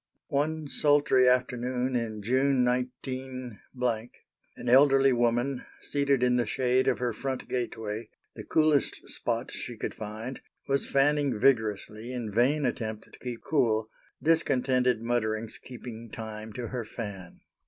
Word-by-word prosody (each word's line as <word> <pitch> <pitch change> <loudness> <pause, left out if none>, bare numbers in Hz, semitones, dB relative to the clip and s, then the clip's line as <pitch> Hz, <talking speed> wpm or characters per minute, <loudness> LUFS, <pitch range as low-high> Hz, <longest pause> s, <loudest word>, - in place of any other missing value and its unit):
* - - -50
One 150 +2 0
sultry 145 -3 +4
afternoon 125 0 0
in 110 -3 -2
June, 130 +2 +3
19—, 130 -1 -3 1.0
an - - -7
elderly 135 +1 +6
woman. 120 +2 +1 0.2
seated 140 -3 +1
in 125 0 +4
the 120 -3 +1
shade 130 +3 +2
of - - +3
her 125 -2 -1
front 130 +4 -4
gateway, 110 -3 -3 0.3
the - - -7
coolest 155 -3 +2
spot 120 +1 -2
she 120 - -6
could - - -3
find, 110 +4 -6 0.3
was 140 0 0
fanning 140 -3 +2
vigorously 110 -1 +1
in 120 -4 -4
vain 135 +7 +2
attempt 110 -3 -3
to - - -13
keep 120 -2 -6
cool, 115 -7 +1 0.3
discontented 130 -6 +2
mutterings 115 -2 -1
keeping 115 -2 -9
time 110 0 -7
to 120 0 -5
her 125 -2 -3
fan. 100 -5 -8
125 Hz, 135 wpm, -28 LUFS, 115-135 Hz, 1.0 s, elderly